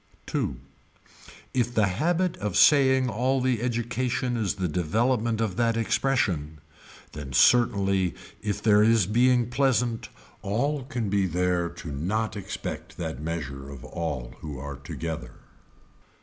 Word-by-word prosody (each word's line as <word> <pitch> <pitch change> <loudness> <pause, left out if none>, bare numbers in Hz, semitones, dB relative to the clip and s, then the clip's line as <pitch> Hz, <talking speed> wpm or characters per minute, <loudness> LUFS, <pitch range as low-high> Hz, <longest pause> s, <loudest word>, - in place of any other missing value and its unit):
Two. - - -2 1.0
If 120 -1 0
the 110 - +4
habit 170 - 0
of 105 -3 -2
saying 130 -3 +5
all 125 +4 +1
the 125 -3 0
education 120 +1 -1
is 105 -5 -1
the 95 -2 -1
development 110 - 0
of 110 -4 -1
that 115 -1 +2
expression 105 - 0 0.5
then 70 -3 -7
certainly 100 - +3 0.3
if 105 -2 -3
there 105 -2 +5
is 110 -2 +4
being 120 +3 +3
pleasant 125 -3 +1 0.3
all 130 +7 -1
can 120 -7 -3
be 100 -1 +2
there 90 0 0
to 85 -2 -8
not 105 +11 -1
expect 100 - -6
that 65 - -4
measure 70 -4 -5
of 70 -3 -9
all 70 -8 -4
who 75 -3 -7
are 70 +1 -6
together. 70 -2 -6
105 Hz, 135 wpm, -26 LUFS, 85-120 Hz, 1.0 s, saying